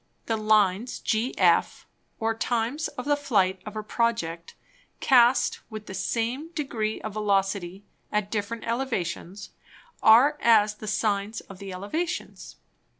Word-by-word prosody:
The 225 - 0
Lines 215 +1 +2
GF, 225 +3 +1 0.4
or 225 0 0
Times 240 +6 -1
of 250 - -8
the 290 0 +3
Flight 195 -10 +1
of 215 - -7
a 215 - -4
Project 210 -8 -2 0.4
cast 250 -1 +4
with 215 -2 -8
the 190 - -8
same 240 +10 -2
Degree 230 -9 -2
of 215 - -5
Velocity 195 -2 -1 0.3
at 210 -1 -1
different 220 +2 -3
Elevations, 205 -6 -3 0.5
are 265 +7 +6
as 215 -3 +5
the 215 0 -10
Sines 210 +1 -1
of 195 -2 -13
the 195 -1 -7
Elevations. 205 - -4
215 Hz, 130 wpm, -26 LUFS, 200-235 Hz, 0.5 s, are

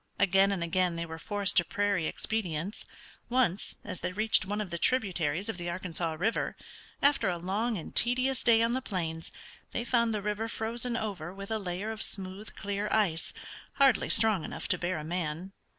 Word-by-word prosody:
Again 195 +1 +4
and 185 -4 -1
again 175 0 +1
they 170 0 -3
were 160 0 -7
forced 205 +2 0
to 175 - +7
prairie 200 -3 0
expedients. 190 -3 -3 0.4
Once, 240 -7 +1
as - - -5
they - - -2
reached 215 -1 +4
one 205 +1 -2
of 205 -5 -3
the 170 - -3
tributaries 185 - +1
of 225 - -3
the 175 -1 -4
Arkansas 170 -2 -2
River, 190 +9 0 0.5
after 280 -8 +4
a 175 - -1
long 205 +6 -1
and 165 - -8
tedious 255 +2 +2
day 230 -1 +6
on 230 +1 +2
the 260 - 0
plains, 165 -7 -4 0.4
they 235 - -1
found 235 -1 +2
the 210 -2 -2
river 210 +2 -1
frozen 235 +2 -2
over 185 -7 -4
with 195 +2 -8
a 220 - 0
layer 195 +2 -3
of 220 0 -6
smooth, 195 +2 -5
clear 200 +1 -2
ice, 185 -7 +1 0.4
hardly 270 -5 +4
strong 215 -6 +4
enough - - -5
to - - +1
bear 175 0 -1
a 155 - -5
man. 170 +2 -3
200 Hz, 190 wpm, -30 LUFS, 175-225 Hz, 0.5 s, to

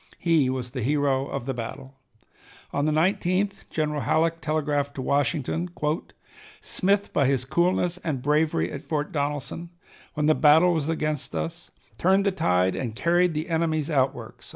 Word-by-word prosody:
He 160 -6 +2
was 125 -2 -3
the 130 -1 -4
hero 140 +1 +1
of 135 -3 -4
the 135 - -2
battle. 120 +3 -7 0.8
On 145 - 0
the 155 - +2
19th 185 +4 0
General 150 -2 -1
Halleck 165 +6 +1
telegraphed 145 -2 -1
to 135 - -4
Washington: 145 +5 0 0.9
"Smith, 200 +2 0
by 140 - +3
his 130 -2 +1
coolness 175 +3 +1
and 145 -8 -3
bravery 150 - +1
at 140 - -6
Fort 150 -2 -3
Donelson, 145 +3 -3 0.5
when 150 -1 0
the 155 - +5
battle 160 +4 +5
was 160 -2 -1
against 155 -2 -2
us, 170 +1 -4 0.3
turned 190 +3 +3
the 200 - +3
tide 90 - +1
and 115 -4 -4
carried 170 +5 +2
the 155 +3 -2
enemy's 160 -2 0
outworks." 135 -2 -1
150 Hz, 155 wpm, -25 LUFS, 135-170 Hz, 0.9 s, the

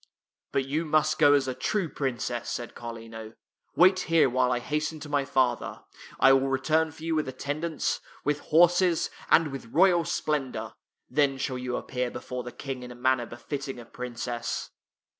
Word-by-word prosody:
" - - -65
But 135 - 0
you 150 +5 -1
must 155 -1 +2
go 145 - +7
as 140 -2 +3
a 130 - -1
true 175 +9 -1
princess," 125 -4 -3
said 120 - -4
Carlino. 115 -1 -8 0.2
" - - -46
Wait 185 +1 +6
here 165 -7 +3
while 125 0 +2
I 125 - +2
hasten 150 +5 -2
to 150 - -7
my 145 -1 +1
father. 130 -2 0 0.4
I 135 - +7
will 135 0 +3
return 155 +4 +2
for 155 +1 -13
you 165 0 -1
with 155 -2 0
attendants, 145 +5 -2 0.2
with 145 +1 0
horses, 175 +1 +4 0.2
and 165 -2 +5
with 135 -4 -7
royal 175 +6 +4
splendor. 135 - -2 0.3
Then 140 0 +2
shall 130 -1 -2
you 125 -1 -3
appear 125 -1 -2
before 125 +1 -5
the 120 0 -7
King 135 -1 -6
in 125 - -8
a 125 - -9
manner 125 -1 +1
befitting 135 +3 -5
a 120 - -9
princess." 120 -1 -4
135 Hz, 180 wpm, -27 LUFS, 125-155 Hz, 0.4 s, go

